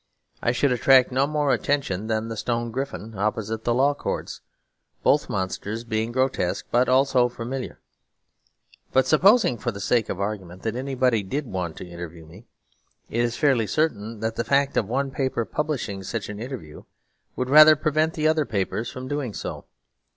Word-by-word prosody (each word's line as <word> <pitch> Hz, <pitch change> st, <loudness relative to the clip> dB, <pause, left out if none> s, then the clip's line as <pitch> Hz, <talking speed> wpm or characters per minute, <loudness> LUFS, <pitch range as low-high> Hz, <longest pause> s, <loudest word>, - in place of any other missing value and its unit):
I 120 Hz, -, +2 dB
should 130 Hz, +2 st, +1 dB
attract 130 Hz, +1 st, +5 dB
no 135 Hz, +2 st, +2 dB
more 150 Hz, -2 st, +1 dB
attention 110 Hz, -8 st, -1 dB
than 110 Hz, 0 st, -1 dB
the 115 Hz, -, -5 dB
stone 120 Hz, +1 st, -2 dB
griffin 125 Hz, -3 st, -5 dB
opposite 110 Hz, +2 st, -2 dB
the 120 Hz, -, +2 dB
Law 140 Hz, +3 st, +3 dB
Courts; -, -, -5 dB, 0.6 s
both -, -, +3 dB
monsters 100 Hz, +4 st, -3 dB
being 110 Hz, -1 st, -2 dB
grotesque 130 Hz, -8 st, 0 dB
but 125 Hz, +2 st, +3 dB
also 130 Hz, -1 st, +4 dB
familiar. 125 Hz, +2 st, -6 dB, 1.1 s
But 130 Hz, -1 st, +4 dB
supposing 160 Hz, -, +4 dB
for 120 Hz, -, -2 dB
the 100 Hz, -, -8 dB
sake 115 Hz, +3 st, +1 dB
of 95 Hz, -, -3 dB
argument 95 Hz, -3 st, -4 dB
that 110 Hz, 0 st, -2 dB
anybody 130 Hz, -3 st, +1 dB
did 135 Hz, +10 st, -3 dB
want 90 Hz, -7 st, -4 dB
to -, -, -8 dB
interview 85 Hz, -1 st, -9 dB
me, 90 Hz, +9 st, -15 dB, 0.6 s
it 120 Hz, -, +1 dB
is 120 Hz, -1 st, -1 dB
fairly 130 Hz, -7 st, +2 dB
certain 115 Hz, -8 st, -1 dB
that 110 Hz, 0 st, -2 dB
the 115 Hz, -, 0 dB
fact 140 Hz, +3 st, +1 dB
of 100 Hz, -, +1 dB
one 135 Hz, +3 st, -1 dB
paper 130 Hz, -3 st, -1 dB
publishing 140 Hz, -11 st, -3 dB
such 100 Hz, +2 st, -4 dB
an 105 Hz, 0 st, -6 dB
interview 115 Hz, -, -8 dB, 0.5 s
would 125 Hz, +1 st, -2 dB
rather 155 Hz, +1 st, +9 dB
prevent 155 Hz, +1 st, 0 dB
the 155 Hz, -1 st, +1 dB
other 155 Hz, -1 st, +2 dB
papers 105 Hz, +3 st, -2 dB
from 130 Hz, 0 st, -7 dB
doing 135 Hz, -6 st, -3 dB
so. -, -, -6 dB
120 Hz, 175 wpm, -24 LUFS, 105-135 Hz, 1.1 s, rather